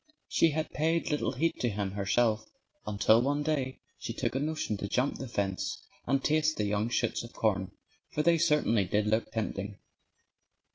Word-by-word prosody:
She 165 Hz, -, +4 dB
had 155 Hz, +1 st, -2 dB
paid 165 Hz, +2 st, 0 dB
little 150 Hz, -, 0 dB
heed 165 Hz, +1 st, 0 dB
to 120 Hz, -, +1 dB
him, 100 Hz, -2 st, -2 dB
herself, 110 Hz, +2 st, +1 dB, 0.4 s
until 105 Hz, +2 st, +4 dB
one 145 Hz, +3 st, 0 dB
day 140 Hz, -4 st, -1 dB, 0.2 s
she -, -, -4 dB
took -, -, -2 dB
a 135 Hz, -, 0 dB
notion 150 Hz, -7 st, -1 dB
to 100 Hz, -, -4 dB
jump 125 Hz, +7 st, 0 dB
the 135 Hz, -, -5 dB
fence 100 Hz, -5 st, -2 dB, 0.3 s
and 135 Hz, 0 st, +2 dB
taste 155 Hz, 0 st, +2 dB
the 105 Hz, -, 0 dB
young 105 Hz, +2 st, 0 dB
shoots 120 Hz, -1 st, 0 dB
of 115 Hz, -, -10 dB
corn. 100 Hz, -4 st, 0 dB, 0.4 s
For 150 Hz, -, -1 dB
they 170 Hz, 0 st, +4 dB
certainly 150 Hz, -, +3 dB
did 105 Hz, +3 st, +1 dB
look 110 Hz, +1 st, 0 dB
tempting. 105 Hz, -2 st, -3 dB
120 Hz, 180 wpm, -30 LUFS, 105-150 Hz, 0.4 s, She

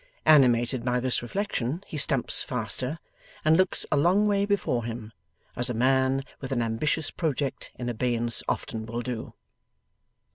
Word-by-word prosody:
Animated 125 Hz, -4 st, +4 dB
by 125 Hz, 0 st, 0 dB
this 125 Hz, 0 st, +1 dB
reflection, 155 Hz, -, -3 dB
he -, -, -9 dB
stumps 135 Hz, -3 st, +2 dB
faster, 125 Hz, +5 st, -2 dB, 0.5 s
and 155 Hz, +1 st, +5 dB
looks 185 Hz, +1 st, +3 dB
a 145 Hz, -, +3 dB
long 185 Hz, +8 st, +3 dB
way 200 Hz, -1 st, +1 dB
before 165 Hz, -, 0 dB
him, 115 Hz, -1 st, -6 dB, 0.4 s
as 125 Hz, +1 st, +2 dB
a 125 Hz, -, -2 dB
man 130 Hz, +2 st, +2 dB, 0.2 s
with 135 Hz, 0 st, -7 dB
an 120 Hz, -3 st, 0 dB
ambitious 145 Hz, +7 st, -1 dB
project 145 Hz, -4 st, -3 dB
in 120 Hz, -, -6 dB
abeyance 120 Hz, 0 st, +1 dB
often 110 Hz, -1 st, -3 dB
will 120 Hz, +1 st, -4 dB
do. 120 Hz, -2 st, -6 dB
125 Hz, 150 wpm, -26 LUFS, 120-150 Hz, 0.5 s, and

